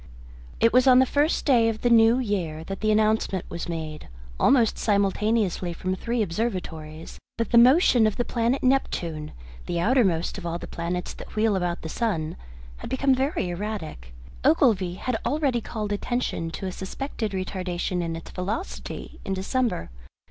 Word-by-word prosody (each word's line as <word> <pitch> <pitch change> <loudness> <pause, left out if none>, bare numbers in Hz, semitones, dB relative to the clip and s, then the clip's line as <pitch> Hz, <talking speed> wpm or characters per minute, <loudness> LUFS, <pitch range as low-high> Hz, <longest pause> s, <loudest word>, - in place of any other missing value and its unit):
It 230 - +4
was 255 +1 +5
on 255 -1 +8
the 260 - +6
first 290 +5 +1
day 235 -5 +4
of 220 -1 -4
the 245 - +2
new 225 +1 +6
year 185 -10 -2
that 195 +3 -6
the 215 - +1
announcement 215 -3 +1
was 170 - -5
made, 155 -2 -5 0.3
almost 240 -5 +3
simultaneously 200 -2 +1
from 185 +2 -3
three 230 +4 -1
observatories, 165 -6 -4 0.2
that 230 - -2
the 235 - +7
motion 250 -3 +6
of 215 - -1
the 240 - -1
planet 240 +3 0
Neptune, 170 - 0 0.4
the 170 - -1
outermost 190 -5 +2
of - - -10
all 170 0 -2
the - - -8
planets 175 +2 -4
that - - -11
wheel 215 -1 +2
about 175 -2 -2
the - - -4
sun, 165 -5 -2 0.4
had - - -8
become 270 +1 +2
very 265 - 0
erratic. 175 - -5 0.3
Ogilvy 185 -3 +3
had 235 +4 -2
already 270 -2 0
called 210 -2 -4
attention 205 -5 -2
to 165 - -6
a 185 - -2
suspected 220 +4 -4
retardation 185 -1 -2
in 165 -1 -3
its 165 - -9
velocity 200 - -5
in 195 - -2
December. 195 - -1
205 Hz, 165 wpm, -25 LUFS, 175-240 Hz, 0.4 s, on